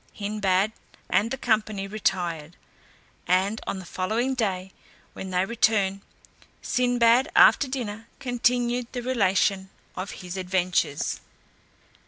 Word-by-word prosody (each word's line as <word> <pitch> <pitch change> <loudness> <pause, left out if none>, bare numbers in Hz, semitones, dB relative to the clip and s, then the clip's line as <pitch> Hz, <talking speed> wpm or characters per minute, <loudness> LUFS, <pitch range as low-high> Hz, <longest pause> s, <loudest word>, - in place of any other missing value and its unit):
Hindbad 200 -1 +1 0.4
and 220 - +3
the 270 - -3
company 215 -5 0
retired; 175 -6 -2 0.7
and 190 +4 +1
on - - -2
the 190 - -8
following 220 +9 -1
day, 190 -6 -2 0.4
when 190 - -7
they 185 0 +1
returned, 200 -3 +1 0.6
Sinbad 245 +1 +3
after 280 - +6
dinner 230 -4 -5
continued 245 -1 0
the 245 -1 -4
relation 195 -5 +1 0.3
of 185 +2 -5 0.2
his 180 +1 -6
adventures. 180 -5 0
205 Hz, 110 wpm, -25 LUFS, 185-240 Hz, 0.7 s, after